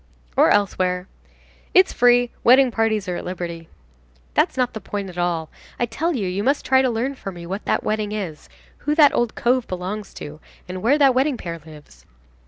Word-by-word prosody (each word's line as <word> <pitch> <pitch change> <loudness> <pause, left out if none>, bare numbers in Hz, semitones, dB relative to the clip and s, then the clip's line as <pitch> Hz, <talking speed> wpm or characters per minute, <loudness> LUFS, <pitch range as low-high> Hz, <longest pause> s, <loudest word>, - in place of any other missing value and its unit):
"Or - - +5
elsewhere." 185 -2 +1 0.7
"It's 375 0 +6
free. 245 0 +4
Wedding 255 +1 +6
parties 220 -3 0
are 180 -1 -2
at - - -6
liberty." 170 -2 -6 0.6
"That's - - +1
not 250 -1 +1
the 220 - -6
point 195 -1 -5
at 175 - -15
all. 170 -2 -1 0.3
I 240 - +2
tell 315 +9 -2
you 225 - -2
that 180 - -2
you 195 +3 -2
must 275 +4 +1
try 265 0 +4
to 260 - +2
learn 240 +4 -1
for 200 -7 -7
me 175 -2 -10
what 195 +4 -5
that - - 0
wedding 215 -1 -1
is, 185 -8 -5 0.3
who 300 +1 -1
that 300 -3 +6
old 240 -2 0
cove 250 +1 +1
belongs 190 +3 -5
to, 150 +1 -8 0.3
and 185 0 -6
where 255 +8 +3
that 275 -3 +5
wedding 265 +1 +1
pair 170 -4 -6
lives." 150 - -15
210 Hz, 200 wpm, -22 LUFS, 180-250 Hz, 0.7 s, It's